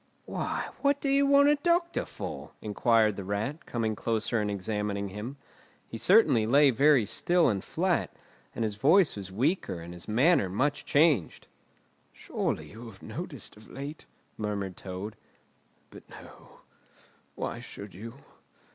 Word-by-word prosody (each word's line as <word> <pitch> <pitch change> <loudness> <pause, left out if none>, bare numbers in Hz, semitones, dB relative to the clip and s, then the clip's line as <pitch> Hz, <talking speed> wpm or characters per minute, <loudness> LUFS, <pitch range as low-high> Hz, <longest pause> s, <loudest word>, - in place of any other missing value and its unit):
"Why, - - -3
what 280 0 +2
do 280 - -1
you 280 +1 +3
want 280 +1 +6
a 295 - +4
doctor 340 +2 +1
for?" - - -7
inquired 110 0 +2
the 100 - -4
Rat, 105 - -3
coming 110 -2 -1
closer 115 +1 0
and 105 - -1
examining 100 0 -2
him. 105 +8 -7 0.5
He 115 - -7
certainly 135 - +5
lay 140 +3 +6
very 135 -1 +4
still 175 - +2
and 100 -4 -1
flat, - - 0 0.5
and - - -1
his 105 -2 -2
voice 160 - +4
was 95 -2 -7
weaker 130 - 0
and 85 +1 -9
his 90 -1 -10
manner 125 - +3
much 140 +10 -1
changed. 145 - +2 0.6
"Surely - - -3
you 115 +3 -10
have 100 -4 -13
noticed - - -7
of 105 +1 -16
late——" 145 +3 -8 0.3
murmured 100 -3 -3
Toad. 95 +4 -7 0.8
"But, - - -14
no—why - - -11
should 100 -1 -10
you? 115 +6 -9
115 Hz, 145 wpm, -29 LUFS, 100-150 Hz, 0.8 s, want